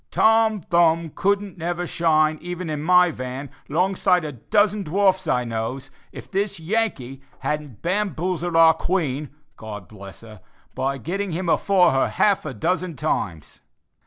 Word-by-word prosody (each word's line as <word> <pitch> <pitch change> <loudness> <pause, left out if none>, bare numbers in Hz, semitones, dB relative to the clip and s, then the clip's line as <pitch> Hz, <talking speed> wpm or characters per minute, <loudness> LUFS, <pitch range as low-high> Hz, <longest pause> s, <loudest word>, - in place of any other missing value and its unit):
Tom 220 -2 +3
Thumb 165 -1 +2
couldn't 200 0 -1
never 175 +1 -2
shine, 155 -2 +2
even 175 -1 -5
in 150 -1 -3
my 180 +2 +5
van, 130 0 -6 0.2
'long 180 +6 +1
side 180 -3 +2
of - - -3
a - - -6
dozen 205 - +1
dwarfs 190 +1 +1
I 125 -4 +1
knows, 115 +3 -4 0.2
if - - -11
this 195 -1 -1
Yankee 160 - -2 0.2
hadn't 150 -6 -4
bamboozled 175 -2 -1
our 165 0 +7
Queen, 155 -5 -2 0.3
God 105 -4 -8
bless 100 -2 -11
her 110 -3 -13 0.3
by 135 +1 -2
getting 185 - -3
him 175 +2 -3
afore 185 +2 +4
her 135 0 +2
half 200 -6 +1
a 135 - -5
dozen 180 - -1
times." 85 - -3
165 Hz, 155 wpm, -23 LUFS, 135-185 Hz, 0.3 s, our